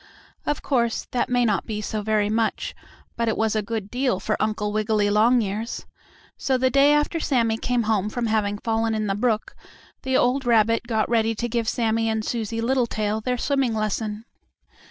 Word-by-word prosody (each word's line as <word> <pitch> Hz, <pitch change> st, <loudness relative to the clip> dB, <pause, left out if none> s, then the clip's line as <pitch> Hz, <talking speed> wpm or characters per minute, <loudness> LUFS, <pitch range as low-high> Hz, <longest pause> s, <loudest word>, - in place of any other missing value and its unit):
Of 295 Hz, -, -1 dB
course, 235 Hz, -4 st, 0 dB
that 245 Hz, -, 0 dB
may 245 Hz, -1 st, +2 dB
not 210 Hz, -4 st, 0 dB
be 215 Hz, -1 st, -3 dB
so 215 Hz, 0 st, -3 dB
very 210 Hz, -1 st, +1 dB
much, 225 Hz, 0 st, -1 dB, 0.4 s
but 235 Hz, 0 st, -1 dB
it 225 Hz, -, 0 dB
was 220 Hz, 0 st, +1 dB
a 215 Hz, -, +2 dB
good 210 Hz, -1 st, -5 dB
deal 250 Hz, -6 st, 0 dB
for 215 Hz, -, -1 dB
Uncle 215 Hz, -1 st, -1 dB
Wiggily 215 Hz, -1 st, +1 dB
Longears. 220 Hz, 0 st, +1 dB, 0.5 s
So 265 Hz, -1 st, +1 dB
the 260 Hz, 0 st, +2 dB
day 275 Hz, +1 st, +5 dB
after 295 Hz, +3 st, +1 dB
Sammie 235 Hz, -7 st, +1 dB
came 245 Hz, -1 st, 0 dB
home 210 Hz, -2 st, 0 dB
from 240 Hz, +2 st, -2 dB
having 210 Hz, -2 st, 0 dB
fallen 225 Hz, +1 st, 0 dB
in 215 Hz, 0 st, -1 dB
the 195 Hz, -, 0 dB
brook 220 Hz, +1 st, -1 dB, 0.5 s
the 260 Hz, -1 st, +1 dB
old 255 Hz, +3 st, +2 dB
rabbit 230 Hz, -1 st, +2 dB
got 220 Hz, -2 st, +1 dB
ready 225 Hz, -1 st, +1 dB
to 240 Hz, +3 st, -2 dB
give 230 Hz, -1 st, -1 dB
Sammie 225 Hz, -1 st, 0 dB
and 220 Hz, -1 st, -1 dB
Susie 225 Hz, -1 st, -2 dB
Littletail 230 Hz, -4 st, 0 dB
their 250 Hz, +2 st, -1 dB
swimming 265 Hz, -3 st, 0 dB
lesson. 215 Hz, 0 st, -2 dB
225 Hz, 185 wpm, -24 LUFS, 215-245 Hz, 0.5 s, day